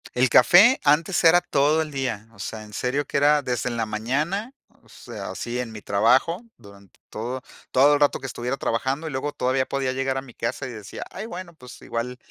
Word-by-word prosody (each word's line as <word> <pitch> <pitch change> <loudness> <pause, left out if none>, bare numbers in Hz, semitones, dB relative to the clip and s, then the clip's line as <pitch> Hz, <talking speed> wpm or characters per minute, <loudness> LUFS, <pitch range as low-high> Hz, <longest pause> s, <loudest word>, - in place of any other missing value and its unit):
El 125 +1 +3
café 185 - +7
antes 155 +6 +2
era 170 +1 +7
todo 150 -1 +2
el 155 - -4
día, 130 -6 -3
o - - -20
sea, 110 -1 -6
en 105 0 -14
serio 130 +6 -1
que - - -10
era 145 +1 +4
desde 125 -1 -2
en 120 - -4
la 115 - 0
mañana, 150 - -2 0.3
o - - -24
sea, - - -8
así 120 +1 -5
en 125 -2 -4
mi 110 -1 -9
trabajo, 125 - +2 0.2
durante 100 -3 -17
todo 120 +4 -5 0.3
todo 140 +3 +5
el 145 - +2
rato 145 - +3
que 135 - -6
estuviera 125 +1 -3
trabajando, 135 +8 -2
y - - -5
luego 140 +2 -3
todavía 130 -1 0
podía 135 -1 -2
llegar 135 0 -1
a - - -2
mi 130 -3 -14
casa 115 +4 -3
y - - -7
decía: 105 -3 -8
"Ay, 210 +4 -6
bueno, 180 -4 -8
pues, 125 -6 -13
igual 120 +2 -4
130 Hz, 220 wpm, -24 LUFS, 120-150 Hz, 0.3 s, café